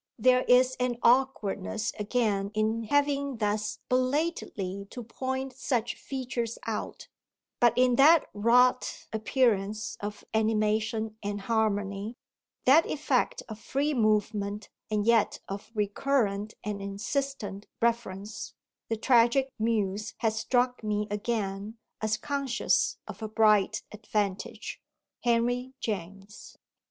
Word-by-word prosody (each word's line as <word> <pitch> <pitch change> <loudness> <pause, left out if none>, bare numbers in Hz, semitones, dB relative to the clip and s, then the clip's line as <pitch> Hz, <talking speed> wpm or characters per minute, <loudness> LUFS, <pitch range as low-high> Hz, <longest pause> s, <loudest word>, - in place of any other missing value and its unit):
There 255 +2 +4
is 255 +1 +5
an 250 -1 0
awkwardness 220 -4 +1
again 210 -2 0
in 220 +1 0
having 280 0 +1
thus 210 0 -1
belatedly 255 - -1
to 245 - -7
point 260 +3 -4
such 245 -2 -1
features 245 -4 -4
out; 225 -2 -4 0.5
but 240 -1 +4
in 250 -1 +4
that 310 +3 +6
wrought 245 +4 +3
appearance 215 -2 0
of 205 0 -6
animation 220 0 0
and 205 0 -3
harmony, 205 0 -1 0.5
that 290 +6 +6
effect 405 - 0
of 220 -1 -8
free 285 +6 -1
movement 210 -3 0 0.2
and 210 -1 0
yet 230 -2 +3
of 200 +2 -6
recurrent 210 -1 0
and 205 -1 -4
insistent 205 0 -3
reference, 220 -3 -2 0.3
The 225 - 0
Tragic 245 +3 +4
Muse 215 -1 -1
has 220 -1 0
struck 250 +1 +1
me 210 0 0
again 210 0 -2 0.2
as 215 0 +1
conscious 275 -1 0
of - - -9
a 220 - -3
bright 215 -1 +3
advantage. 210 -2 -3 0.4
HENRY 245 +2 0
JAMES. 195 0 -6
220 Hz, 110 wpm, -28 LUFS, 210-250 Hz, 0.5 s, that